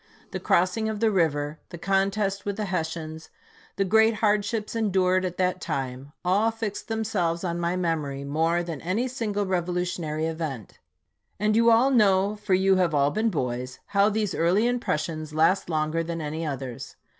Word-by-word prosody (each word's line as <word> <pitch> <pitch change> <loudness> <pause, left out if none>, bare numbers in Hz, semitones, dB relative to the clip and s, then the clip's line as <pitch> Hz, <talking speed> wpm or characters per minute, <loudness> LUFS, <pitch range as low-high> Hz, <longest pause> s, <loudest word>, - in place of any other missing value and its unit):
The - - -3
crossing 185 +5 +1
of 215 -1 -3
the 225 0 +3
river; 155 -5 0
the 175 - -8
contest 195 +2 0
with 200 -1 -3
the 215 - -2
Hessians; 160 -3 -4 0.5
the 195 - +1
great 220 +3 +4
hardships 210 +1 0
endured 185 -4 +2
at 180 -1 -4
that 185 0 0
time, 135 +1 -4
all 200 +5 +3
fixed 225 -2 -5
themselves 205 -7 -1
on 170 -1 -2
my 170 +1 0
memory 155 -6 -2
more 165 +4 +1
than 165 -5 -6
any 200 +9 -1
single 215 -5 -2
revolutionary 175 -3 -1
event; 160 - -5 0.6
and 210 +1 +2
you 230 +1 +5
all 235 +4 +5
know, 200 -4 +3
for 210 -2 +1
you 190 0 +3
have 175 -4 +2
all 140 0 +3
been 220 +2 +1
boys, 125 - -3
how 200 +1 +4
these 210 -3 -1
early 180 +7 +2
impressions 155 - -2
last 180 +4 +3
longer 155 0 0
than 165 0 -4
any 155 +1 -4
others. 135 -4 -6
180 Hz, 165 wpm, -26 LUFS, 160-210 Hz, 0.6 s, you